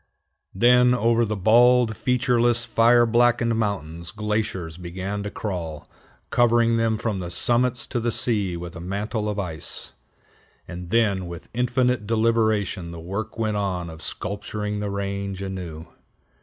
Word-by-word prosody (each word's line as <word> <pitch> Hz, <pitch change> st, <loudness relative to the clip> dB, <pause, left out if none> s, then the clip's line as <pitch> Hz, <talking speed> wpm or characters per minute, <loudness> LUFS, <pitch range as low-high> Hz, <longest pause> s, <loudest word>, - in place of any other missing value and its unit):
Then 125 Hz, +3 st, +5 dB
over 115 Hz, 0 st, +2 dB
the 110 Hz, 0 st, -2 dB
bald, 115 Hz, +3 st, +4 dB
featureless, 120 Hz, 0 st, +2 dB
fire 120 Hz, +1 st, +4 dB
blackened 120 Hz, 0 st, +3 dB
mountains, 85 Hz, -6 st, -3 dB
glaciers 105 Hz, -5 st, -3 dB
began 95 Hz, +3 st, -5 dB
to 100 Hz, -, -4 dB
crawl, 85 Hz, -8 st, -5 dB, 0.4 s
covering 120 Hz, -1 st, +3 dB
them 115 Hz, -1 st, +1 dB
from 105 Hz, -3 st, -2 dB
the 90 Hz, -2 st, -5 dB
summits 120 Hz, +5 st, +1 dB
to 120 Hz, -, -3 dB
the 120 Hz, 0 st, -1 dB
sea 110 Hz, -7 st, +2 dB
with 85 Hz, 0 st, -8 dB
a -, -, -7 dB
mantle 105 Hz, +4 st, -3 dB
of 105 Hz, -, -3 dB
ice; 85 Hz, -7 st, -4 dB, 0.7 s
and 90 Hz, -1 st, -8 dB
then 100 Hz, -4 st, +1 dB
with 85 Hz, -1 st, -9 dB
infinite 125 Hz, -2 st, 0 dB
deliberation 110 Hz, -5 st, +1 dB
the 85 Hz, 0 st, -8 dB
work 100 Hz, +7 st, -5 dB
went 110 Hz, -2 st, -1 dB
on 90 Hz, -4 st, -2 dB
of 80 Hz, 0 st, -11 dB
sculpturing 105 Hz, +3 st, -4 dB
the 105 Hz, 0 st, -3 dB
range 100 Hz, -1 st, -3 dB
anew. 90 Hz, -5 st, -6 dB
105 Hz, 140 wpm, -24 LUFS, 95-115 Hz, 0.7 s, Then